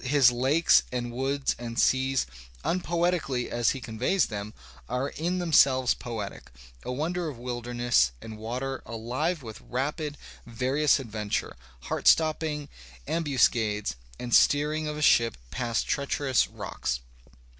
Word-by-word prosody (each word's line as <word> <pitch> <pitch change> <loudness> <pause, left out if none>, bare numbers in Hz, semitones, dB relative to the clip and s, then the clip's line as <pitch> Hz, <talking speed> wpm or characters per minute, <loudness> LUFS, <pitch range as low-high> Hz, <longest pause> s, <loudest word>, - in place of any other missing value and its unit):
His 130 -2 +5
lakes 135 +7 +4
and 120 -1 -3
woods 135 +3 -1
and 115 -1 -6
seas, 130 +1 +2 0.4
unpoetically 170 -7 0
as 120 -1 +2
he 135 - -1
conveys 125 - 0
them, 105 0 -6 0.3
are 130 +3 -1
in 175 +3 -2
themselves 140 -7 +4
poetic, 110 -4 -7 0.3
a - - -5
wonder 165 +5 -2
of 140 - -8
wilderness 120 - +1
and 110 +5 -9
water 130 +4 -4
alive 130 +9 -2
with 110 -2 -9
rapid, 145 +3 -3 0.3
various 130 +6 +1
adventure, 105 -5 -3 0.3
heart - - -2
stopping 155 -2 +3 0.4
ambuscades, 115 - +1 0.2
the 120 - -6
steering 150 +4 +3
of 150 0 -3
a 150 - -2
ship 115 - +4
past 120 -2 -1
treacherous 140 -2 +1
rocks. 60 - -4
130 Hz, 125 wpm, -27 LUFS, 120-150 Hz, 0.4 s, His